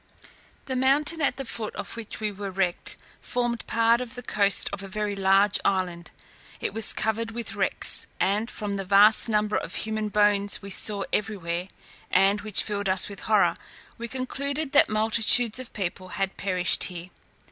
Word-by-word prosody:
The 260 Hz, -, -4 dB
mountain 290 Hz, +5 st, +2 dB
at 280 Hz, -, 0 dB
the 270 Hz, -, -5 dB
foot 225 Hz, -2 st, -5 dB
of 185 Hz, -, -7 dB
which 225 Hz, -2 st, -5 dB
we 215 Hz, -1 st, -2 dB
were 200 Hz, 0 st, -6 dB
wrecked 185 Hz, -2 st, 0 dB, 0.2 s
formed 240 Hz, -2 st, -3 dB
part 230 Hz, +1 st, +2 dB
of 250 Hz, 0 st, -7 dB
the 245 Hz, -, -7 dB
coast 200 Hz, -3 st, +2 dB
of 200 Hz, -, -5 dB
a 195 Hz, -, -8 dB
very 210 Hz, +1 st, -3 dB
large 195 Hz, +1 st, +3 dB
island. 180 Hz, -3 st, -2 dB, 0.5 s
It -, -, -4 dB
was 225 Hz, 0 st, +3 dB
covered 225 Hz, +1 st, -2 dB
with 230 Hz, 0 st, -5 dB
wrecks, -, -, +3 dB
and 210 Hz, +4 st, 0 dB
from 205 Hz, -2 st, -4 dB
the 195 Hz, -, -3 dB
vast 205 Hz, +4 st, +6 dB
number 210 Hz, -1 st, 0 dB
of -, -, -5 dB
human 215 Hz, -1 st, -3 dB
bones 205 Hz, -1 st, +2 dB
we 200 Hz, -1 st, -10 dB
saw 200 Hz, 0 st, +1 dB
everywhere, 185 Hz, -4 st, -2 dB, 0.4 s
and 195 Hz, +2 st, +2 dB
which 215 Hz, -1 st, -1 dB
filled 205 Hz, -2 st, -3 dB
us 185 Hz, 0 st, +3 dB
with 200 Hz, -1 st, -9 dB
horror, 215 Hz, -2 st, +4 dB, 0.5 s
we 235 Hz, -, -5 dB
concluded 275 Hz, +4 st, -3 dB
that 290 Hz, -, +5 dB
multitudes 220 Hz, +2 st, +2 dB
of 255 Hz, -, -8 dB
people 185 Hz, -1 st, -5 dB
had 195 Hz, 0 st, -3 dB
perished 185 Hz, -2 st, +1 dB
there. 180 Hz, 0 st, -9 dB
210 Hz, 175 wpm, -25 LUFS, 195-230 Hz, 0.5 s, vast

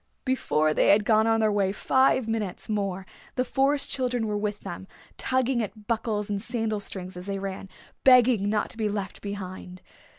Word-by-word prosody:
Before 155 Hz, -, +1 dB
they -, -, +3 dB
had 205 Hz, +1 st, +5 dB
gone 220 Hz, 0 st, +4 dB
on 225 Hz, 0 st, +3 dB
their 215 Hz, -1 st, +3 dB
way 200 Hz, -2 st, +1 dB
five 260 Hz, +3 st, +2 dB
minutes 215 Hz, -5 st, -3 dB
more 195 Hz, -3 st, -2 dB, 0.3 s
the 255 Hz, -, +1 dB
Forest 275 Hz, +2 st, +1 dB
Children 250 Hz, -3 st, 0 dB
were 210 Hz, -, -2 dB
up 205 Hz, -, -2 dB
with 210 Hz, -1 st, -2 dB
them, 190 Hz, -1 st, -7 dB, 0.3 s
tugging 260 Hz, -1 st, 0 dB
at 215 Hz, 0 st, -6 dB
buckles 220 Hz, -3 st, -1 dB
and 205 Hz, -1 st, -2 dB
sandal 225 Hz, -2 st, -2 dB
strings 185 Hz, -2 st, -7 dB
as 180 Hz, +2 st, -8 dB
they 200 Hz, 0 st, -2 dB
ran, 195 Hz, 0 st, -5 dB, 0.3 s
begging 250 Hz, -5 st, +5 dB
not 210 Hz, 0 st, 0 dB
to 235 Hz, -, -14 dB
be 215 Hz, -2 st, 0 dB
left 200 Hz, -2 st, -4 dB
behind. 185 Hz, -2 st, -7 dB
210 Hz, 190 wpm, -26 LUFS, 195-235 Hz, 0.3 s, had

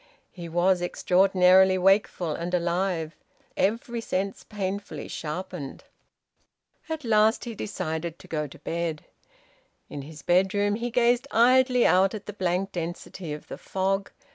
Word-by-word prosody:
He 170 Hz, -2 st, -8 dB
was 175 Hz, +2 st, +2 dB
extraordinarily 185 Hz, +1 st, +4 dB
wakeful 185 Hz, -3 st, +2 dB
and 170 Hz, +4 st, -2 dB
alive, 170 Hz, -2 st, -1 dB, 0.4 s
every 230 Hz, +3 st, -1 dB
sense 195 Hz, -2 st, -3 dB
painfully 195 Hz, -5 st, -5 dB
sharpened. 165 Hz, -2 st, -6 dB, 1.1 s
At 320 Hz, -2 st, -4 dB
last 220 Hz, 0 st, +3 dB
he 235 Hz, -, -5 dB
decided 165 Hz, -5 st, -4 dB
to -, -, -15 dB
go 150 Hz, -2 st, -2 dB
to 140 Hz, -, -13 dB
bed. 165 Hz, 0 st, -3 dB, 0.8 s
In 145 Hz, -, -6 dB
his 150 Hz, +1 st, -11 dB
bedroom 195 Hz, +3 st, +2 dB
he 235 Hz, +3 st, -2 dB
gazed 240 Hz, +1 st, +2 dB
idly 250 Hz, +1 st, +4 dB
out 190 Hz, +3 st, +4 dB
at 210 Hz, -, -8 dB
the 210 Hz, -, -6 dB
blank 185 Hz, 0 st, -1 dB
density 175 Hz, 0 st, -6 dB
of 150 Hz, 0 st, -7 dB
the -, -, -8 dB
fog. 195 Hz, +1 st, -1 dB
185 Hz, 135 wpm, -26 LUFS, 170-205 Hz, 1.1 s, extraordinarily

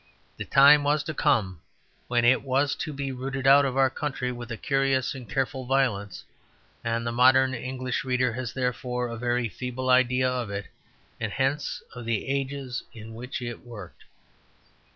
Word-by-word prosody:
The -, -, -5 dB
time 145 Hz, +1 st, +7 dB
was 145 Hz, +1 st, +1 dB
to 155 Hz, -, -4 dB
come 95 Hz, -, +1 dB, 0.5 s
when 120 Hz, -1 st, +2 dB
it 130 Hz, +2 st, +5 dB
was 140 Hz, +1 st, +1 dB
to 155 Hz, -, -4 dB
be 140 Hz, -1 st, -4 dB
rooted 130 Hz, +1 st, -4 dB
out 140 Hz, +1 st, +7 dB
of 135 Hz, -1 st, -2 dB
our 135 Hz, -1 st, +4 dB
country 135 Hz, -4 st, -3 dB
with 120 Hz, -1 st, -8 dB
a 115 Hz, -, -4 dB
curious 135 Hz, -1 st, +1 dB
and 125 Hz, -5 st, -10 dB
careful 130 Hz, 0 st, -2 dB
violence; 120 Hz, -7 st, 0 dB, 0.6 s
and 115 Hz, 0 st, -1 dB
the 120 Hz, -, -1 dB
modern 130 Hz, +2 st, +5 dB
English 130 Hz, 0 st, -3 dB
reader 125 Hz, -2 st, +1 dB
has 120 Hz, -1 st, -4 dB
therefore 125 Hz, 0 st, -2 dB
a 115 Hz, -, -5 dB
very 120 Hz, 0 st, 0 dB
feeble 125 Hz, +4 st, -3 dB
idea 130 Hz, 0 st, +3 dB
of 125 Hz, -4 st, -2 dB
it 100 Hz, 0 st, -4 dB, 0.5 s
and 115 Hz, -2 st, -3 dB
hence 135 Hz, +4 st, -1 dB
of 120 Hz, -2 st, -8 dB
the 115 Hz, 0 st, -1 dB
ages 135 Hz, -2 st, -3 dB
in 110 Hz, 0 st, -10 dB
which 125 Hz, +2 st, -6 dB
it 120 Hz, -1 st, -5 dB
worked. 105 Hz, -7 st, -11 dB
125 Hz, 175 wpm, -26 LUFS, 120-135 Hz, 0.6 s, time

